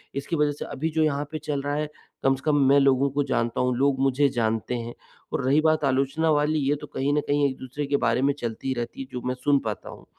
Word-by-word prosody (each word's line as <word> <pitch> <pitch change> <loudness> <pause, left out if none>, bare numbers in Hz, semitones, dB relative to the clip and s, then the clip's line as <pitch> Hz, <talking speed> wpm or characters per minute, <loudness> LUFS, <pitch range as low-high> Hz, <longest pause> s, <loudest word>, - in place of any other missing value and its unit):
इसकी 140 +5 -2
वजह 150 0 +2
से 145 - -6
अभी 145 +3 -3
जो 160 - +3
यहाँ 145 -1 0
पे 155 - -4
चल 145 -2 -2
रहा 145 +1 -2
है, 150 0 -1 0.4
कम 135 0 +4
से 130 - -11
कम 150 -1 +3
मैं 140 +1 +6
लोगों 135 0 +3
को 145 +1 0
जानता 120 -3 -1
हूँ, 125 0 +1
लोग 135 0 +2
मुझे 135 +1 +3
जानते 115 -1 -1
हैं। 120 0 -5 0.4
और - - -1
रही 145 +4 +4
बात 155 -1 +2
आलोचना 135 +4 +1
वाली 150 +1 +2
ये 145 - +3
तो 150 - -7
कहीं 140 +1 -1
न 150 - +2
कहीं 145 0 +2
एक 130 - -6
दूसरे 130 +3 -5
के 140 - +2
बारे 120 -2 +1
में 140 - +3
चलती 120 +3 -3
रहती 120 +1 -5
है 135 - -7
जो 125 - -5
मैं 125 - -1
सुन 140 +2 +2
पाता 105 -2 -4
हूँ। - - -12
140 Hz, 265 wpm, -25 LUFS, 130-145 Hz, 0.4 s, मैं